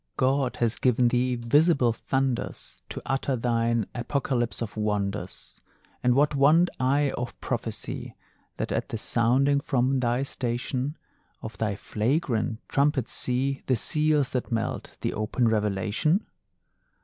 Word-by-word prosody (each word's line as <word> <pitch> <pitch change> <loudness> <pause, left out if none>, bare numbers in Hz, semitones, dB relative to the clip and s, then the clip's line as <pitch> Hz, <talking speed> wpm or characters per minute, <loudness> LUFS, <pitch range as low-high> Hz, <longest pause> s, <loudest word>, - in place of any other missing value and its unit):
God 130 0 +1
has 115 -1 0
given 125 -1 +3
thee 125 +1 +1
visible 125 +1 +3
thunders 135 +1 -2
To - - -5
utter 135 +1 0
thine 115 -2 +1
apocalypse 120 -1 -1
of 115 -3 -4
wonders, 105 -3 -3 0.4
And 125 0 +4
what 145 +2 +3
want 155 +6 +4
I 140 +2 +2
of 120 0 -5
prophecy, - - -4 0.4
That - - -3
at - - -1
the 115 - -3
sounding 130 +6 +2
from 130 -1 +1
thy 120 +1 +1
station 130 +2 -2 0.5
Of 110 - -7
thy 105 -3 0
flagrant 115 +1 -1
trumpet, 140 -3 +1
see 135 +2 0
The 130 - +3
seals 150 +2 +2
that 125 0 -3
melt, 115 -1 -2
the - - -1
open 110 +3 0
revelation? 110 - +1
125 Hz, 130 wpm, -26 LUFS, 115-140 Hz, 0.5 s, And